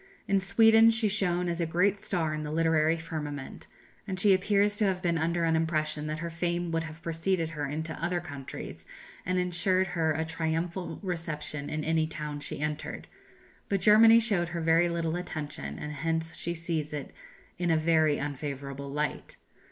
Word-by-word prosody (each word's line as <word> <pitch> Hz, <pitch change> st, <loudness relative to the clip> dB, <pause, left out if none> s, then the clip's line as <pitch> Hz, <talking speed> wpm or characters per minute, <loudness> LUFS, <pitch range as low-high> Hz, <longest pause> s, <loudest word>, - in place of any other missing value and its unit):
In 195 Hz, 0 st, +3 dB
Sweden 225 Hz, +3 st, +6 dB
she 225 Hz, -1 st, +1 dB
shone 180 Hz, -4 st, 0 dB
as 170 Hz, 0 st, -1 dB
a 165 Hz, -, 0 dB
great 185 Hz, +5 st, +2 dB
star 165 Hz, -6 st, -1 dB
in 155 Hz, -, -3 dB
the 150 Hz, -, -4 dB
literary 160 Hz, 0 st, +2 dB
firmament; 150 Hz, -4 st, -6 dB, 0.4 s
and 185 Hz, -1 st, -3 dB
she 200 Hz, +1 st, +6 dB
appears 200 Hz, +2 st, +2 dB
to 215 Hz, -, +2 dB
have 190 Hz, -2 st, +1 dB
been 170 Hz, -2 st, 0 dB
under 170 Hz, +2 st, 0 dB
an 165 Hz, -1 st, +3 dB
impression 155 Hz, -2 st, 0 dB
that 155 Hz, 0 st, -2 dB
her 170 Hz, -, -4 dB
fame 175 Hz, +1 st, -1 dB
would 165 Hz, 0 st, 0 dB
have 155 Hz, +1 st, -10 dB
preceded 165 Hz, 0 st, -1 dB
her 145 Hz, -3 st, -3 dB
into 155 Hz, +2 st, -4 dB
other 175 Hz, +1 st, +1 dB
countries, 140 Hz, -6 st, -8 dB, 0.4 s
and 185 Hz, 0 st, +1 dB
ensured 180 Hz, +1 st, +1 dB
her 160 Hz, -2 st, +2 dB
a 160 Hz, +1 st, -1 dB
triumphal 165 Hz, +3 st, -2 dB
reception 155 Hz, -5 st, -4 dB
in 155 Hz, 0 st, -2 dB
any 160 Hz, 0 st, +1 dB
town 150 Hz, -2 st, -5 dB
she 145 Hz, -, -6 dB
entered; 150 Hz, 0 st, -4 dB, 0.6 s
but 200 Hz, -, +1 dB
Germany 225 Hz, +4 st, +7 dB
showed 200 Hz, -7 st, +1 dB
her 170 Hz, 0 st, -4 dB
very 165 Hz, +2 st, +4 dB
little 170 Hz, -1 st, -1 dB
attention, 155 Hz, -3 st, -5 dB
and 150 Hz, -, -5 dB
hence 160 Hz, +2 st, -2 dB
she 170 Hz, 0 st, -3 dB
sees 160 Hz, -3 st, -3 dB
it 145 Hz, -2 st, -5 dB, 0.5 s
in 175 Hz, -1 st, 0 dB
a 160 Hz, -, +4 dB
very 155 Hz, -2 st, +3 dB
unfavourable 140 Hz, -1 st, -5 dB
light. 150 Hz, +1 st, -3 dB
165 Hz, 180 wpm, -29 LUFS, 155-180 Hz, 0.6 s, Germany